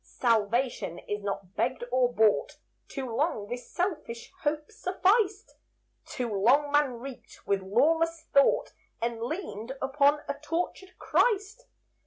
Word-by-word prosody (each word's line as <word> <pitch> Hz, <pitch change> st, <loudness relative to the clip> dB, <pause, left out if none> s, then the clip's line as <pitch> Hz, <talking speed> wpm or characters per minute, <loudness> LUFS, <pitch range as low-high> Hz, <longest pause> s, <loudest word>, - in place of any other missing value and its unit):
Salvation 230 Hz, -4 st, 0 dB
is 205 Hz, +3 st, -5 dB
not 195 Hz, -2 st, -5 dB
begged 255 Hz, 0 st, 0 dB
or 250 Hz, -1 st, +3 dB
bought; 220 Hz, -3 st, +2 dB, 0.3 s
Too 260 Hz, -5 st, -5 dB
long 255 Hz, -7 st, 0 dB
this 245 Hz, 0 st, -6 dB
selfish 305 Hz, -11 st, -3 dB
hope 300 Hz, +4 st, -1 dB
sufficed; 400 Hz, +1 st, +1 dB, 0.5 s
Too 250 Hz, -2 st, -3 dB
long 260 Hz, +9 st, +3 dB
man 290 Hz, -3 st, +3 dB
reeked 250 Hz, +2 st, -10 dB
with 200 Hz, -1 st, +1 dB
lawless 320 Hz, +11 st, +2 dB
thought, 280 Hz, -, +4 dB, 0.3 s
And 230 Hz, 0 st, -2 dB
leaned 255 Hz, -, -4 dB
upon 285 Hz, +2 st, +3 dB
a 285 Hz, -, -4 dB
tortured 355 Hz, +4 st, -3 dB
Christ. 435 Hz, +1 st, +1 dB
270 Hz, 125 wpm, -28 LUFS, 230-330 Hz, 0.5 s, thought